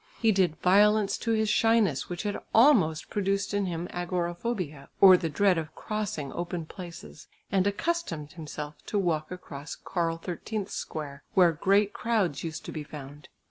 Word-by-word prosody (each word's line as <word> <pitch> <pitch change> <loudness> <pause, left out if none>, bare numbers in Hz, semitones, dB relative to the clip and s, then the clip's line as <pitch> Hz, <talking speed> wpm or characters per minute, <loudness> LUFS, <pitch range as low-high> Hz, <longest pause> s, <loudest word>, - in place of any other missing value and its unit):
He 225 -2 +4
did 185 -6 +2
violence 205 +3 +4
to 230 - -1
his 220 -1 +1
shyness, 215 - +2
which 175 +1 -4
had 205 -1 -2 0.2
almost 215 - +4
produced 200 0 0
in 205 -1 0
him 170 0 -3
"agoraphobia," 175 -3 -3
or 190 -2 +9
the 175 -2 -1
dread 185 +3 +3
of 155 -1 -7
crossing 205 -10 -4
open 175 -1 -4
places, 170 -3 -10 0.2
and 195 0 +2
accustomed 200 - -2
himself 150 -2 -7
to 210 - -1
walk 160 -5 0
across 155 -5 -8
Karl 165 -2 -2
XIII's 195 +4 -4
square 145 -2 -6
where 180 -3 +6
great 195 +5 +2
crowds 210 -11 0
used 160 -1 -5
to - - -6
be 155 - -5
found. 145 -1 -10
180 Hz, 160 wpm, -28 LUFS, 155-205 Hz, 0.2 s, or